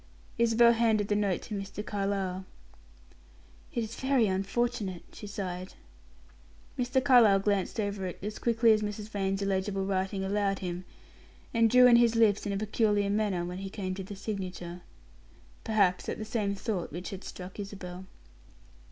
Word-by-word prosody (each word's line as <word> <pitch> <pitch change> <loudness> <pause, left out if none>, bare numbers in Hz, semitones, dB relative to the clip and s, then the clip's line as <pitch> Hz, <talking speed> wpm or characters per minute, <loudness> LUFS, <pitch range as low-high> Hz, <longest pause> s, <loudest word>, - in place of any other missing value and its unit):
Isabel 235 0 +6
handed 220 -3 +2
the 205 - +2
note 200 -4 0
to - - -7
Mr. 200 +1 -5
Carlyle. 195 -2 -2 1.3
"It 235 - -1
is 220 +1 -6
very 265 -2 +2
unfortunate," 195 0 -1
she 210 - -9
sighed. 185 -2 -5 1.0
Mr. 250 +1 0
Carlyle 240 -8 +6
glanced 200 +1 0
over 200 -2 -2
it 180 - -6
as 210 +1 -4
quickly 230 -1 +4
as 215 - +1
Mrs. 210 0 -4
Vane's 195 -1 -1
illegible 195 0 -1
writing 190 0 -1
allowed 200 0 0
him, 180 -1 -5 0.7
and 230 -1 +4
drew 250 +2 +7
in 240 -1 +8
his 235 -1 +4
lips 215 -2 +3
in - - -1
a 200 - -1
peculiar 205 -1 +1
manner 200 -4 0
when 180 +1 -5
he 195 0 -5
came 190 -2 -4
to 190 +1 -5
the 200 +2 -8
signature. 185 -4 -5 0.8
Perhaps 200 -5 +2
at - - -3
the 215 - -5
same 210 -3 -1
thought 195 -3 -3
which 175 +4 -6
had 195 -1 -7
struck 185 +2 -9
Isabel. 190 -2 -7
200 Hz, 160 wpm, -29 LUFS, 190-220 Hz, 1.3 s, in